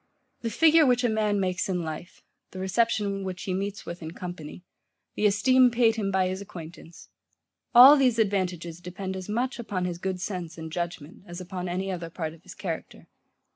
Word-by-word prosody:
The 230 - -2
figure 320 +7 +5
which 250 -3 +3
a 245 - +3
man 215 -2 +1
makes 185 0 -1
in 180 -2 -1
life, 160 +3 -7 0.3
the - - -11
reception 200 0 0
which 185 -1 -5
he 185 - -2
meets 200 +2 -3
with 170 +1 -7
in 160 0 -7
company, 175 -2 -8 0.5
the 210 - +2
esteem 255 +5 +5
paid 230 -2 +3
him 210 -3 -1
by 190 -1 +2
his 185 +1 -4
acquaintance; 170 -3 -11 0.7
all 260 +4 +11
these 255 -5 +3
advantages 180 -6 -1
depend 190 +2 -5
as 185 +1 -7
much 245 +4 -1
upon 195 -6 -3
his 175 -1 -4
good 190 0 -3
sense 180 -4 -5
and 160 -1 -7
judgement, 170 -2 -5
as 175 +1 -7
upon 180 0 -5
any 190 +2 -2
other 170 -2 -5
part 160 -2 -4
of 165 - -17
his - - -12
character. 180 -4 -6
190 Hz, 190 wpm, -27 LUFS, 175-215 Hz, 0.7 s, all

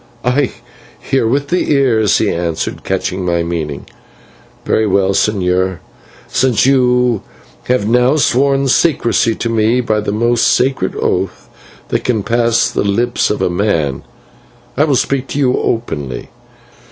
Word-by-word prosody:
"I 125 +2 +1 0.5
hear 135 -4 0
with 140 +4 -1
the 180 -1 0
Ears," 115 -7 +2
he - - +1
answered, 85 -1 -3
catching 95 0 -2
my 85 -1 0
meaning. 80 -4 -4 0.8
"Very 110 - +1
well, 100 0 +2
señor, 95 -3 0 0.5
since 125 -4 +1
you 125 -4 +2 0.4
have 125 -5 0
now 125 +4 +3
sworn 135 0 +2
secrecy 120 -5 +2
to - - -3
me 115 +1 +1
by 110 -3 0
the 105 - -2
most 120 +2 +1
solemn 130 -7 +1
oath 95 0 -2 0.4
that - - -1
can 110 -5 0
pass 115 +1 +1
the - - -1
lips 115 +5 0
of 105 - -2
man, 85 -8 -1 0.7
I 145 - +3
will 145 -3 +1
speak 135 +1 -1
to - - -5
you 130 -3 +2
openly. 70 - -3
115 Hz, 140 wpm, -15 LUFS, 95-125 Hz, 0.8 s, now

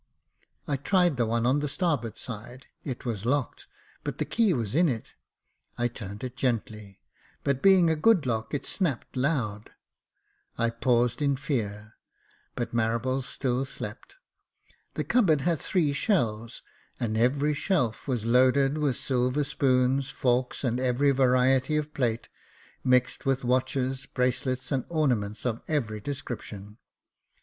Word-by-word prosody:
I 140 - 0
tried 175 +1 +2
the 120 -2 +1
one 115 +1 0
on 130 +4 +3
the 150 - -1
starboard 135 - -1
side; 120 +2 -8 0.2
it 130 -4 -6
was 110 -5 -3
locked, 130 +2 -1 0.4
but - - -4
the - - -1
key 230 -4 +2
was 115 - -1
in 170 +3 +4
it. 115 -4 -4 0.6
I 120 0 +1
turned 100 -2 -8
it 125 -1 -5
gently, 110 -6 -3 0.4
but 140 -1 0
being 190 -3 +6
a 160 - +3
good 180 0 +4
lock, 110 -2 -2
it 145 - -3
snapped 155 - -2
loud. 125 -7 -1 0.9
I 115 0 +1
paused 120 +2 +1
in 140 -1 +2
fear 110 -6 -4 0.3
— - - -36
but 120 - -3
Marables 120 +3 0
still 130 -1 -1
slept. 135 - -7 0.8
The - - -1
cupboard 190 - +3
had 165 0 +1
three 160 -7 +1
shelves, 115 - -1 0.4
and 110 -2 -1
every 140 +6 +2
shelf 145 - -1
was 120 -5 -1
loaded 130 +4 +3
with 145 -4 +1
silver 130 +2 0
spoons, 135 0 +1
forks, 125 -3 0
and 125 -1 0
every 130 +2 +2
variety 130 +2 +3
of 150 0 -3
plate, 120 -4 -1 0.6
mixed 125 +2 +2
with 135 -1 +1
watches, 130 +1 0
bracelets, 130 +1 -1
and 135 -3 +1
ornaments 125 -11 0
of 115 -2 -1
every 115 -9 -1
description. 105 -4 -7
130 Hz, 145 wpm, -27 LUFS, 115-145 Hz, 0.9 s, being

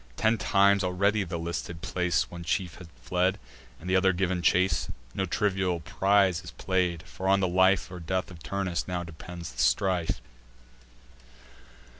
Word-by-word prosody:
Ten 110 0 +2
times 100 +1 +4
already 100 +3 +1
round 95 - -4
the 85 - -3
listed 85 0 -5
place 90 -1 0
One 85 -1 -7
chief 85 0 -2
had 90 - -10 0.2
fled, 90 +5 +1 0.4
and 85 - -10
t' 95 - +2
other 95 0 +4
giv'n 95 0 0
the - - -4
chase: 90 +2 +2 0.2
No 95 - -1
trivial 95 -2 0
prize 95 +1 +2
is 85 - -8
play'd; 90 -3 -1
for 95 0 -6
on 100 +1 +4
the 95 - +1
life 95 +1 +3
Or 90 - -7
death 95 +3 -2
of 85 -2 -12
Turnus 95 -2 -2
now 90 -2 -2
depends 85 -1 -8
the - - -12
strife. 85 +8 +1
90 Hz, 170 wpm, -28 LUFS, 85-95 Hz, 0.4 s, times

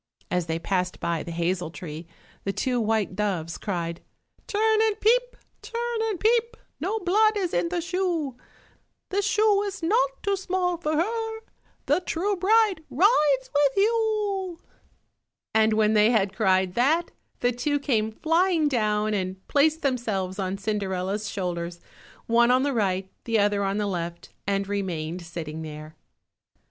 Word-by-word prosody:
As 180 -1 0
they 160 0 -1
passed 180 +1 -1
by 170 -2 -1
the - - -7
hazel 170 +1 -1
tree, 165 -1 -8 0.4
the 195 - -1
two 245 +3 0
white 220 -3 0
doves 185 -5 -2
cried— 170 -4 -3 0.5
"Turn 435 +1 +2
and 435 -1 +1
peep, - - +2 0.2
turn 475 -1 -3
and 395 -5 -3
peep, 460 +1 +2 0.2
No 380 +9 -1
blood 430 +3 +3
is 365 -4 -1
in 335 - +1
the 350 -1 -1
shoe, 345 -6 -1 0.7
The 395 +2 +1
shoe 415 0 +3
is 400 -3 -5
not 480 +8 +1
too 400 0 +1
small 370 -2 -1
for 310 -2 -2
her, 445 +6 -1 0.5
The 290 +5 +3
true 370 +3 -1
bride 400 -2 +3
rides 295 - +3
with 285 +1 +3
you," 415 -4 +1 1.0
and 220 0 +4
when 215 0 +3
they 210 0 +5
had 205 -4 +1
cried 190 -4 +2
that, 300 - +2 0.3
the 245 - +3
two 255 +5 0
came 220 -6 0
flying 325 +5 +2
down 215 -5 +1
and 190 -1 -3
placed 310 +3 +2
themselves 210 -8 -1
on 190 0 -2
Cinderella's 200 0 -2
shoulders, 175 -2 -3 0.5
one 235 +1 +4
on 255 +1 +4
the 285 -1 0
right, 190 -4 0 0.2
the 230 -1 +1
other 205 -1 +2
on 195 +1 0
the 210 - 0
left, 170 -3 -4 0.2
and 200 -1 0
remained 180 -4 -3
sitting 160 -2 -6
there. 155 0 -8
240 Hz, 155 wpm, -25 LUFS, -, 1.0 s, they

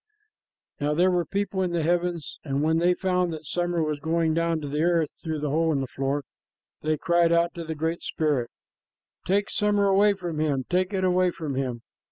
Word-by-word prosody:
Now 150 +1 0
there 180 +3 +4
were 175 -1 +1
people 200 0 -1
in 180 -2 -1
the 170 -2 0
heavens, 175 -2 -1
and 140 -1 -1
when 160 +1 +2
they 175 +1 +3
found 180 -2 0
that 155 0 -8
summer 175 +1 0
was 155 -1 -2
going 160 +1 +1
down 165 0 +1
to 145 - -5
the 150 +2 -1
earth 170 -2 +2
through 160 -2 -3
the 150 -2 -1
hole 160 +2 +2
in 145 - +1
the 135 - -1
floor, 135 +2 -2 0.6
they 155 0 0
cried 170 +2 +2
out 170 0 +3
to 170 - -6
the 160 0 -5
Great 160 +2 -2
Spirit, 145 -7 -1 0.8
"Take 200 +2 +1
summer 205 -1 +2
away 200 +1 +4
from 175 -5 -5
him, 140 -4 0
take 185 +1 +1
it 190 -2 -1
away 185 0 +3
from 155 -5 -5
him!" 125 -3 -3
165 Hz, 210 wpm, -26 LUFS, 150-180 Hz, 0.8 s, there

